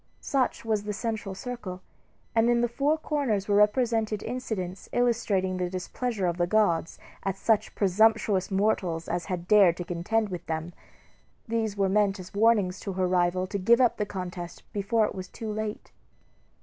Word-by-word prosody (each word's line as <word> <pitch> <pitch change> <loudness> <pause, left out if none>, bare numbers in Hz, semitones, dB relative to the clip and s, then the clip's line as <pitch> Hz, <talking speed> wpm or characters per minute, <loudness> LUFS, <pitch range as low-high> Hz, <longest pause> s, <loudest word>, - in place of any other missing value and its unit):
Such 265 -4 -1
was 215 -2 0
the 210 - -2
central 220 -2 -3
circle; 220 -6 -6 0.5
and 230 +1 +3
in 240 0 +3
the 240 - +2
four 280 +6 +1
corners 275 -11 -1
were 205 - +2
represented 220 -1 +2
incidents 215 -7 -4
illustrating 210 -6 +1
the 180 -1 -1
displeasure 195 +3 -3
of 175 -1 0
the 175 -1 +1
gods 175 -5 +1 0.2
at 195 -1 -2
such 220 0 +1
presumptuous 205 0 +3
mortals 190 -5 0
as 175 - -2
had 180 -3 -4
dared 195 -5 +6
to 175 - -3
contend 200 +6 -1
with 180 -2 -5
them. 160 +2 -3 0.7
These 220 -2 -1
were 195 -1 +2
meant 200 0 +2
as 185 - -10
warnings 205 -3 +3
to 195 - -5
her 185 0 0
rival 180 0 +1
to 200 +2 -4
give 235 +6 +4
up 245 -2 +3
the 210 - -1
contest 180 -3 -6
before 215 +2 +1
it - - -4
was 185 -2 -6
too 220 +2 -6
late. 215 0 -5
205 Hz, 175 wpm, -27 LUFS, 185-225 Hz, 0.7 s, dared